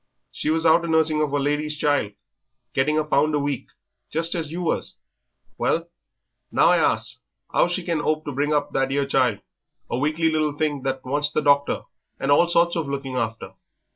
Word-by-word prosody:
She's 160 +1 -1
out 165 +1 +5
a'nursing 160 -2 +2
of 150 -2 0
a 145 - +1
lady's 150 +2 -1
child, 145 -9 +1 0.6
getting 150 +3 +1
a 155 - +2
pound 150 0 +2
a - - +2
week, 140 -2 -3 0.4
just 165 +2 -1
as 160 -4 -3
you 175 +2 -4
was; 165 - -2 0.6
well, 165 +1 0 0.6
now - - +4
I 175 - +5
asks 125 -4 0 0.3
'ow - - +4
she 175 +1 -2
can 165 -3 -1
'ope 155 +1 -1
to 145 - -3
bring 145 +3 -1
up 150 -1 0
that 135 0 0
'ere 140 0 +1
child 125 -6 +1 0.5
a 120 - 0
weakly 155 +3 +1
little 155 -2 0
thing 150 -3 -1
that 135 0 -3
wants 145 +3 +1
the 155 0 -1
doctor 140 0 +2 0.4
and 140 - 0
all 160 +4 +5
sorts 170 0 +2
of 165 -4 -2
looking 135 -2 -4
after. 115 -2 -3
150 Hz, 190 wpm, -23 LUFS, 140-160 Hz, 0.6 s, out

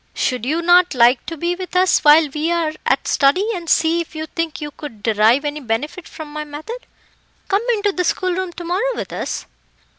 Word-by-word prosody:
"Should 250 -1 -1
you 325 +4 0
not 350 -2 +4
like 245 +1 +4
to 330 - -5
be 345 +3 -1
with 365 -1 -7
us 370 0 +4
while 305 +1 +6
we 305 +3 -2
are 330 -2 0
at - - +1
study, 295 +9 +3
and 345 -4 -6
see 330 +1 +3
if 325 - -9
you 315 0 -4
think 330 0 -4
you 295 -1 -6
could 230 -9 -10
derive 225 +6 +3
any 295 +1 -3
benefit 290 +8 -3
from 315 -2 -10
my 305 0 -4
method? 310 +12 -8 0.6
Come 395 +1 +2
into 410 -2 0
the 365 -1 -1
schoolroom 370 +1 -1
to 345 - -8
morrow 395 +9 -1
with - - -6
us?" - - -4
320 Hz, 205 wpm, -19 LUFS, 295-360 Hz, 0.6 s, while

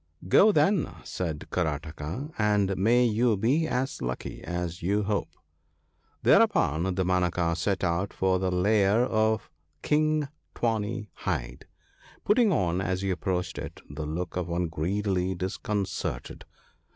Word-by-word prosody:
' - - -12
Go, 215 - +8
then/ 195 -4 +2
said 80 -5 -4
Karataka; 80 - -3
' - - -22
and 105 -2 +2
may 120 +6 +4
you 115 -1 +2
be 140 +11 +2
as 130 -1 -2
lucky 65 +1 -4
as 90 0 -4
you 100 +4 +1
hope.' 105 0 -2 0.5
" - - -42
Thereupon 130 - +4
Damanaka 90 -2 +1
set 95 +1 -1
out 90 +3 0
for 95 -1 +1
the 95 0 0
lair 100 +5 +3
of 110 -2 0 0.3
King 155 0 +2 0.3
Tawny 110 -2 -2
hide; - - -4 0.6
putting 215 0 +4
on, 90 - +1
as 95 0 -2
he 95 - 0
approached 90 0 -2
it, - - -7
the 75 +1 -6
look 85 +3 -4
of 90 -1 -2
one 85 0 -1
greatly 95 +3 -1
disconcerted. 95 -7 -3
95 Hz, 140 wpm, -27 LUFS, 90-110 Hz, 0.6 s, Go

